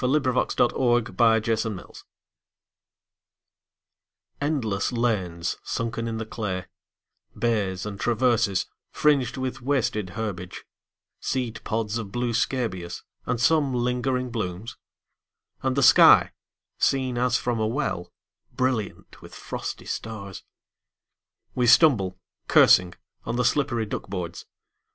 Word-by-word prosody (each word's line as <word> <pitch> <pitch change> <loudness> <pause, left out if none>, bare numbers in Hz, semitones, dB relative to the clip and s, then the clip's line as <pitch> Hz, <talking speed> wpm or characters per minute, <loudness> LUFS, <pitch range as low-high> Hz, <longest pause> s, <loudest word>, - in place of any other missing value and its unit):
Frederic 130 -1 +1
Manning 120 -1 +3
THE 115 -2 +4
TRENCHES 110 -3 -3 2.4
ENDLESS 120 -10 -1
lanes 95 -9 -1
sunken 115 0 -3
in 115 -1 -3
the 110 - -4
clay, 100 -5 -4 0.7
Bays, 105 -6 -1
and 100 -2 -6
traverses, 115 -5 +1 0.2
fringed 140 -4 +1
with 130 -1 -4
wasted 120 -7 0
herbage, 95 -5 -5 0.5
Seed 125 -4 -3
pods 110 0 -2
of 105 -4 -7
blue 120 +1 -1
scabious, 95 -8 -2 0.2
and 125 -1 -1
some 140 +1 +2
lingering 125 +1 -1
blooms; 105 -1 -4 0.9
And 130 -1 0
the 140 - +3
sky, - - +7 0.5
seen 130 -3 +1
as 125 0 +2
from 120 -2 -2
a 110 - +1
well, 120 -7 -3 0.4
Brilliant 125 -6 -2
with - - -12
frosty - - -6
stars. 100 -4 -6 1.1
We 125 -1 +1
stumble, 105 - +5 0.3
cursing, 90 -1 +5 0.3
on 115 - -3
the 125 0 +1
slippery 125 -5 +1
duck 105 - -6
boards. 90 -3 -5
115 Hz, 110 wpm, -25 LUFS, 105-125 Hz, 2.4 s, sky